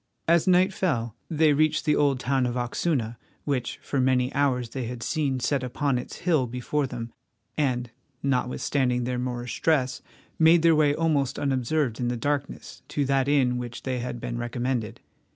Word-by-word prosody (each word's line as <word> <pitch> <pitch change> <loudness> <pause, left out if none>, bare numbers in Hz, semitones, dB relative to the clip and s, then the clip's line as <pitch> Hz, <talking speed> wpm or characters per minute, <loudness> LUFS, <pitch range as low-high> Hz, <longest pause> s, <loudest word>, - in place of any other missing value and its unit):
As 170 +1 +4
night 185 +1 +4
fell 120 - -1
they 155 -2 +3
reached 155 +1 +2
the 150 - +3
old 140 -3 +2
town 130 0 +1
of 120 - -3
Oxuna, 120 -1 -1 0.3
which 130 -5 -2
for 135 - -1
many 130 0 +2
hours 125 -4 +1
they 130 -3 -3
had 120 0 -6
seen 140 -5 0
set 135 +2 0
upon 130 +1 -1
its - - -8
hill 155 -8 +3
before 125 +4 -2
them, 115 -2 -6 0.4
and, 125 -5 0 0.3
notwithstanding 125 -1 0
their 125 0 -2
Moorish 125 -1 -4
dress, 130 -6 +1 0.4
made 165 +1 +6
their 165 -1 +6
way 150 -1 +3
almost 150 -5 +1
unobserved 135 -2 0
in 120 - 0
the 120 0 -1
darkness 140 +3 -3
to 145 - -1
that 135 0 +1
inn 140 -3 +3
to 125 - -1
which 120 -1 -6
they 130 -1 -2
had 120 0 -4
been 120 +1 -4
recommended. 120 -1 -3
130 Hz, 175 wpm, -26 LUFS, 125-145 Hz, 0.4 s, made